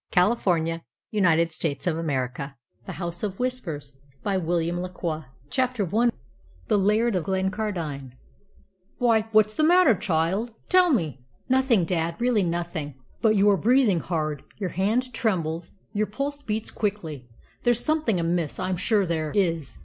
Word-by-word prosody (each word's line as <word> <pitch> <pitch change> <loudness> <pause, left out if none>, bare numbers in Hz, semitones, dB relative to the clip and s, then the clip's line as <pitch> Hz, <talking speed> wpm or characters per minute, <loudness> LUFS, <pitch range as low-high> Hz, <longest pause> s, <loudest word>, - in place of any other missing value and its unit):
CHAPTER 180 +4 +4
XXXIX 165 -6 0 0.3
CONTAINS 170 -5 +3
THE 155 -4 0
CONCLUSION 140 -5 -2 0.3
THE - - -4
HOUSE 175 -1 -5
OF 200 -3 -3
WHISPERS 165 - -3 1.6
CHAPTER 250 -8 0
I 240 +2 +4 0.6
THE 205 - +3
LAIRD 210 +3 +2
OF 180 - 0
GLENCARDINE 190 - -2 0.8
"Why, 225 -3 +3
what's 215 -1 +4
the 310 - 0
matter, 345 -4 +6
child? 195 +4 0
Tell 365 -2 +5
me." 155 - -1 0.2
"Nothing, 260 -8 +3
dad 165 -1 -1
really 240 -3 +2
nothing." 170 -4 -3 0.3
"But 220 -1 +4
you 200 0 +4
are 195 - +3
breathing 225 - +3
hard; 155 -4 -2 0.2
your 190 -4 -3
hand 225 +8 0
trembles; 170 -8 -1 0.2
your 210 0 0
pulse 280 +7 -3
beats 215 -4 -3
quickly. 160 - -3 0.3
There's 240 -1 +2
something 305 - +1
amiss 170 -2 -1
I'm 185 -1 -1
sure 205 +1 +2
there 160 -3 -1
is. 165 - 0
190 Hz, 135 wpm, -25 LUFS, 165-225 Hz, 1.6 s, matter